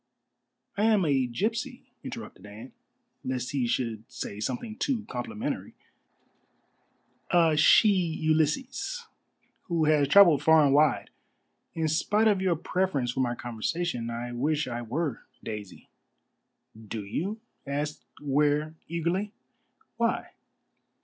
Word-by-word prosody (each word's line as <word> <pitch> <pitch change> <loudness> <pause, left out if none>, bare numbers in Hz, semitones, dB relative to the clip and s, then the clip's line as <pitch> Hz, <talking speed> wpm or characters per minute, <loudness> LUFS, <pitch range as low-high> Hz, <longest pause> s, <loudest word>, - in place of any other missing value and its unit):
"I 210 - +2
am 215 -5 +4
a 135 -4 +2
gipsy," 225 - -2 0.2
interrupted 230 - -8
Anne, 105 +2 -11 0.5
lest 130 -1 -3
he 130 -4 0
should 115 -3 -2
say 100 - -6
something 130 - -3
too 240 -6 -1
complimentary; 120 -3 -4 1.5
"a 165 -3 +4
she 180 +8 +6
Ulysses, 185 - 0 0.6
who 165 -3 +1
has 150 -2 +3
travelled 170 -2 +7
far 160 -1 +6
and 135 - +3
wide. 150 +1 +3 0.6
In 160 -1 0
spite 205 +8 +2
of 200 -3 +3
your 185 -3 +2
preference 165 -6 -1
for 130 - -5
my 120 -2 +1
conversation, 120 +2 -3
I 120 +1 -4
wish 145 +5 0
I 120 -1 -4
were 135 +3 -3 0.2
Daisy." 105 -3 -7 0.9
"Do 110 -1 -7
you?" 195 - -3 0.3
asked 145 +2 -3 0.2
Ware 150 +2 +1
eagerly. 170 +5 -2 0.6
"Why?" 230 -1 0
150 Hz, 115 wpm, -28 LUFS, 125-185 Hz, 1.5 s, travelled